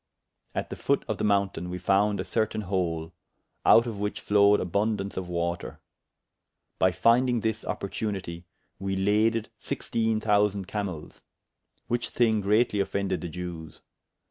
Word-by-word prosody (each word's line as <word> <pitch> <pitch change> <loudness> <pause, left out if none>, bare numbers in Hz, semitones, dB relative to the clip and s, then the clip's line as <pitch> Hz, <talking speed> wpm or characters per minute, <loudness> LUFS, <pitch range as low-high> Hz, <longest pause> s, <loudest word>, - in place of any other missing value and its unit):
At - - -3
the - - -3
foot - - 0
of - - -3
the - - -1
mountayne 100 -3 +1
we 90 - -4
founde 100 +2 +2
a - - -1
certayne 110 +1 -1
hole, 85 -4 -2 0.5
out 115 - +7
of 110 -4 -5
whiche 105 0 -2
flowed 105 0 +4
aboundance 100 +2 -1
of 90 -1 -4
water. 85 0 -3 1.0
By 95 - +4
fyndyng 120 +5 +3
this 110 -1 -1
opportunitie, 95 -4 -4 0.3
we 95 0 -2
laded 105 +3 +2
sixtiene 110 -1 -1
thousand 105 -2 +2
camels; 95 -7 -5 0.6
which 120 0 -2
thyng 110 -3 +2
greatly 105 +1 +2
offended 100 0 -1
the 85 - -4
Jewes. 85 -2 -7
100 Hz, 140 wpm, -27 LUFS, 90-110 Hz, 1.0 s, out